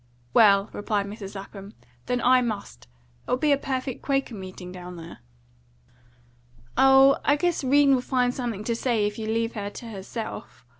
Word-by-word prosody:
"Well," 200 -2 +5
replied 205 -1 -1
Mrs. 200 -1 -8
Lapham, 195 +1 -9 0.3
"then 245 -1 0
I 255 +1 +5
must. 200 - -5 0.4
There'll - - +1
be 300 +2 +1
a - - +6
perfect 260 -2 -4
Quaker 275 -3 -1
meeting 185 -2 -8
down 180 -1 -9
there." 165 0 -10 1.6
"Oh, 270 +1 +6
I 290 - +4
guess 345 0 -1
'Rene 280 +1 +4
will 255 - +2
find 250 -1 0
something 235 -6 -4
to 230 +1 -1
say 230 -3 0
if 210 +1 -3
you 220 - -4
leave 230 +1 -1
her 205 -2 -4
to 230 +3 -9
herself. 200 - -7
230 Hz, 165 wpm, -25 LUFS, 200-260 Hz, 1.6 s, a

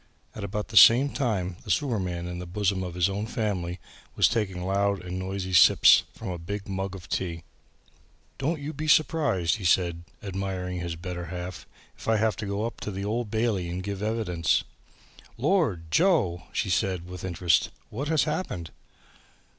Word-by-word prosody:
At 105 - -7
about 105 +2 -4
the 110 - -1
same 130 +7 +8
time 95 -9 -1
the - - -12
sewerman 95 - -1
in 90 0 -5
the 90 - -6
bosom 100 +1 0
of 90 -2 -5
his 90 0 +3
own 100 +2 -3
family 95 -7 -2 0.4
was - - +5
taking 95 -6 -2
loud 100 0 +1
and 90 +1 -4
noisy 95 0 -4
sips 90 - +7
from - - -6
a 90 -2 -4
big 100 +4 -5
mug 95 0 -3
of 90 -3 -10
tea. 85 -3 -3 1.0
"Don't 155 +4 -1
you 145 +2 -5
be 155 0 -4
surprised," 145 - +3
he 105 - -9
said 85 -1 +1
to - - -28
his 100 - -6
admiring 95 -1 -3 0.2
better 90 -1 -5
half, 90 +2 -7 0.3
"if - - -12
I 110 -1 +3
have 110 0 +1
to 105 - -4
go 100 +2 -1
up 115 - -5
to - - -4
the 100 0 -4
Old 115 +1 -2
Bailey 110 -5 0
to 90 +2 -3
give 100 +1 -4
evidence." 105 -6 0 0.7
"Lord! 120 - +1
Joe!" 100 - +2
she 95 - -1
said 90 -1 0
with 90 -1 -8
interest, 85 -2 +2 0.2
"what 135 +7 -4
has 160 -1 +3
happened!" 150 - -3
95 Hz, 180 wpm, -27 LUFS, 90-110 Hz, 1.0 s, same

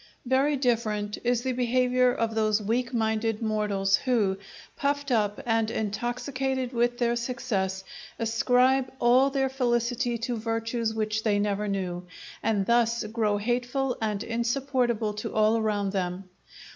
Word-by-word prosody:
Very 270 +3 +2
different 220 -5 0
is 240 0 +1
the 260 - 0
behaviour 250 0 +2
of 230 -2 -1
those 215 -1 +2
weak 235 +4 -1
minded 220 -2 0
mortals 210 -3 +1
who, 210 -7 +1 0.4
puffed 285 0 -1
up 210 -3 +1
and 225 -2 +1
intoxicated 250 +4 -2
with 240 0 +1
their 240 -1 +1
success, 225 -6 -2 0.3
ascribe 250 +3 +2
all 255 +3 +4
their 270 -1 +1
felicity 245 -1 0
to 240 +1 -2
virtues 225 +1 -1
which 215 0 -1
they 215 -2 +1
never 205 0 0
knew, 180 -3 -3 0.3
and 205 -3 +1
thus 235 +1 +2
grow 215 -1 0
hateful 245 +4 -1
and 210 -1 -1
insupportable 235 -1 0
to 210 - -5
all 215 +1 +4
around 210 -3 0
them. 185 -1 -3
230 Hz, 135 wpm, -27 LUFS, 215-250 Hz, 0.4 s, all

